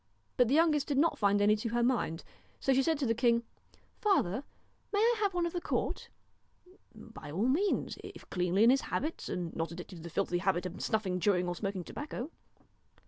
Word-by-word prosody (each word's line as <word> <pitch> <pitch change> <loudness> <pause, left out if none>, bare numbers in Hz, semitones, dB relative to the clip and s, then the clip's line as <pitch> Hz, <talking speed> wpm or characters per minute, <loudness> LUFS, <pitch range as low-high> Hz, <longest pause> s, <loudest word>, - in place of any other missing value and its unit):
But 245 - +4
the 265 - +2
youngest 310 -3 +3
did 285 - 0
not 325 +4 +2
find 205 0 +3
any 210 +1 +5
to 230 +2 -3
her 240 +1 +1
mind, 235 -10 0 0.4
so 270 - +2
she 265 - +4
said 320 +2 +1
to 280 - -1
the 230 - +2
king: 235 0 +2 0.3
' - - -35
Father, 275 - +2 0.5
may 405 - 0
I 460 +3 +4
have 400 -3 0
one 350 -1 +1
of 340 - -3
the 350 - -2
court? - - -2 0.4
' 365 +2 -25
'By 145 - -11
all 190 +11 0
means 350 +10 0
if - - -10
cleanly 180 +3 +2
in 235 - +7
his 270 - +3
habits, 315 +3 -3
and 175 -2 -4
not 165 0 -2
addicted 175 +1 -8
to - - -10
the 170 - -7
filthy 175 0 0
habit 185 -1 0
of 180 - -6
snuffing, 195 -4 0
chewing, 180 -2 +2
or 175 - -1
smoking 195 -1 -3
tobacco.' 295 - -6
230 Hz, 215 wpm, -31 LUFS, 180-295 Hz, 0.5 s, in